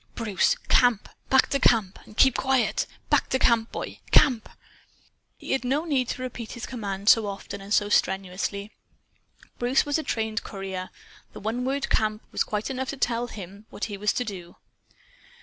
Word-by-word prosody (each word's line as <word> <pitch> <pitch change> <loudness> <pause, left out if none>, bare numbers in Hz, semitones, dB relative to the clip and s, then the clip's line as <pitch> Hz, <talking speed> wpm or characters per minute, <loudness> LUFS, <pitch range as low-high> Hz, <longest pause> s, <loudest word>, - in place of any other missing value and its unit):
"Bruce! 210 -6 +1
Camp! 245 -4 +3 0.2
Back 265 0 +4
to 275 - +2
CAMP! 215 -8 +3
And 215 - -15
keep 265 -2 +6
QUIET! 265 -4 +1 0.2
Back - - +3
to 260 - +2
camp, 235 -3 +3
boy! - - -6
CAMP!" 245 -6 +4 0.9
He - - -7
had 270 - +1
no 280 +6 0
need 270 -6 +1
to 255 - -4
repeat 240 -3 -6
his 240 - -6
command 200 -5 -5
so 220 -1 +6
often 200 0 -6
and 195 +1 -11
so 205 -1 +3
strenuously. 195 +1 0 0.9
Bruce 245 +2 +2
was 290 +2 0
a - - -3
trained 220 -3 -2
courier. 190 -2 -5 0.4
The - - -8
one 230 +4 -2
word 275 +1 -1
"Camp!" 215 0 +1
was - - +1
quite 210 +4 -3
enough 260 0 -3
to 280 - -4
tell 240 -1 0
him 200 -1 -10
what - - -9
he 210 - -5
was 210 +1 +1
to 250 - -1
do. 180 -5 -8
225 Hz, 180 wpm, -26 LUFS, 200-255 Hz, 0.9 s, keep